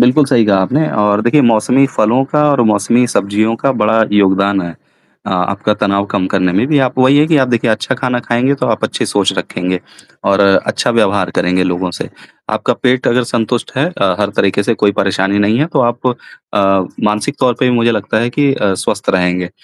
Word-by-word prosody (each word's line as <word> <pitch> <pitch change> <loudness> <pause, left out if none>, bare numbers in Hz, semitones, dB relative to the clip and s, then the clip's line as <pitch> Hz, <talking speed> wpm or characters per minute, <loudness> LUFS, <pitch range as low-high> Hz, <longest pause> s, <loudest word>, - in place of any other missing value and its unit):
बिल्कुल 130 +5 +4
सही 120 -5 +2
कहा 100 -2 +2
आपने 150 +10 0
और 105 0 +1
देखिए 130 +6 +3
मौसमी 120 +4 +3
फलों 120 +5 +2
का 150 0 +2
और 140 -4 +1
मौसमी 120 +4 +1
सब्जियों 110 +1 0
का 135 +4 0
बड़ा 110 -1 +1
योगदान 100 0 +2
है, 85 - -5 0.6
अ, - - -4
आपका 100 +3 -1
तनाव 100 -1 0
कम 95 -2 -1
करने 90 -2 0
में 100 +7 +1
भी। 150 0 +1
आप 130 - -6
वही 130 +2 +4
हैं 150 - +3
कि 160 - +3
आप 130 -3 +2
देखिए 120 -1 0
अच्छा 110 +4 -1
खाना 125 -1 -2
खाएँगे 125 +4 0
तो - - -3
आप - - -1
अच्छे - - -3
सोच - - 0
रखेंगे 90 0 -3 0.4
और 100 0 +2
अच्छा 100 +4 +1
व्यवहार 100 -6 +1
करेंगे 90 +1 +1
लोगों 90 0 -2
से। - - -5 0.4
आपका - - -1
पेट 130 0 +1
अगर 125 +1 +2
संतुष्ट 120 0 -2
है 140 - +1
अ, 100 - 0
हर 100 - 0
तरीके 100 +1 +1
से 115 +2 0
कोई 105 -1 +1
परेशानी 100 +1 0
नहीं 105 +3 +1
है, 150 - +1
तो 170 - -1
आप 120 +2 -8 0.5
अ, 100 - +2 0.4
मानसिक 105 +7 -1
तौर 125 -2 +2
पे 125 - +3
भी - - +1
मुझे 115 0 +2
लगता 110 0 -1
है 120 - -1
कि 140 +2 +1
अ, 95 -2 -1
स्वस्थ - - -2
रहेंगे। 90 -1 -1
110 Hz, 215 wpm, -14 LUFS, 100-125 Hz, 0.6 s, बिल्कुल